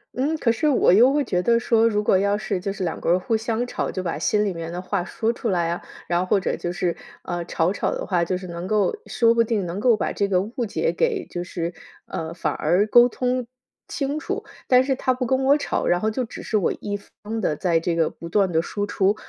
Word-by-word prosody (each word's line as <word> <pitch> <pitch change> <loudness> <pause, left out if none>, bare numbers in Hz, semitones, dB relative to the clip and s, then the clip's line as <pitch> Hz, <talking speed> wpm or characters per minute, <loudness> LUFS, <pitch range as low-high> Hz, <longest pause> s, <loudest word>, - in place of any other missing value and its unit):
嗯， 290 +5 0
可 240 -6 +2
是 300 +7 +1
我 255 -9 +4
又 240 +7 +6
会 290 +1 +2
觉 180 -1 0
得 235 +4 +3
说， 230 -1 +3
如 210 -1 0
果 210 - +3
要 200 +1 +1
是 195 -2 -2
就 195 +2 -3
是 195 -1 -5
两 170 - -3
个 - - -1
人 175 +2 +4
互 225 +5 -1
相 225 +2 -1
吵， 245 - -3
就 185 - -4
把 170 - -3
心 210 0 +2
里 200 - -1
面 165 -1 -6
的 175 - -4
话 185 0 -2
说 225 +5 -1
出 235 - -3
来 170 -3 +1
啊， 175 - -3 0.2
然 175 0 +1
后 - - +1
或 200 - +3
者 190 - -1
就 175 - -4
是， 175 -1 -1 0.3
呃， 175 -1 -3
吵 170 +1 0
吵 - - -1
的 - - -3
话， 180 -3 +1
就 180 +2 -1
是 185 - -9
能 170 0 -6
够 215 - +1
说 230 -1 +3
不 230 0 +4
定 220 -4 -1
能 175 +3 -4
够 230 0 +4
把 - - -1
这 200 - 0
个 185 -2 +2
误 235 +3 -4
解 475 - 0
给 450 -6 0
就 175 - -5
是 175 -1 -4 0.3
呃， 160 0 -5
反 150 -4 -1
而 175 +6 +2
沟 240 +3 +6
通 250 -1 -1 0.4
清 285 +1 -2
楚。 395 +6 -4 0.2
但 255 0 +6
是 270 0 0
他 255 0 0
不 255 0 -2
跟 260 +2 +1
我 280 +2 +5
吵， - - -2
然 175 - +3
后 220 +3 0
就 255 +4 -1
只 235 - -8
是 220 - 0
我 190 - +1
一 205 -1 -3
方 210 +2 -7
地 155 - 0
在 170 +1 +1
这 165 +1 -1
个 165 -1 +2
不 170 - -9
断 195 0 +2
地 160 -1 +2
输 205 +4 -3
出， 200 0 +1
205 Hz, 285 characters per minute, -23 LUFS, 175-240 Hz, 0.4 s, 又